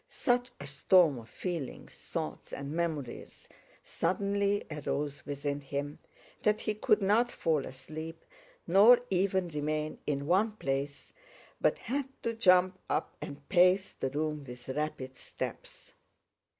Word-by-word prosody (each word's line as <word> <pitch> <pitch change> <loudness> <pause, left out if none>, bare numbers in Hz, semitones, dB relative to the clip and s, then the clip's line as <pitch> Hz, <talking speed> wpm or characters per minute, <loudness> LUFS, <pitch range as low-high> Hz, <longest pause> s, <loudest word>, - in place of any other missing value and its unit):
Such 245 -1 +1
a 140 - -7
storm 145 +1 +4
of 115 - -13
feelings, 170 -7 -5
thoughts, - - -5
and 140 0 -5
memories 155 -6 -4 0.4
suddenly 200 +1 0
arose 145 -1 -3
within 145 0 -2
him 140 +1 -4 0.4
that 210 +1 +2
he 215 - 0
could 210 -1 +2
not 225 +5 +3
fall 155 -4 0
asleep, 155 +5 -8 0.4
nor 225 +6 +7
even 190 -1 +1
remain 150 0 -2
in 140 -1 -1
one 195 +7 +3
place, 140 -6 -3 0.5
but - - +3
had 270 +2 -2 0.2
to 230 - 0
jump 185 -4 +4
up - - -1
and 140 0 -8
pace 185 +1 +4
the 135 - -2
room 150 +1 -2
with 125 -1 -10
rapid 140 -2 -3
steps. - - -7
155 Hz, 130 wpm, -31 LUFS, 140-195 Hz, 0.5 s, nor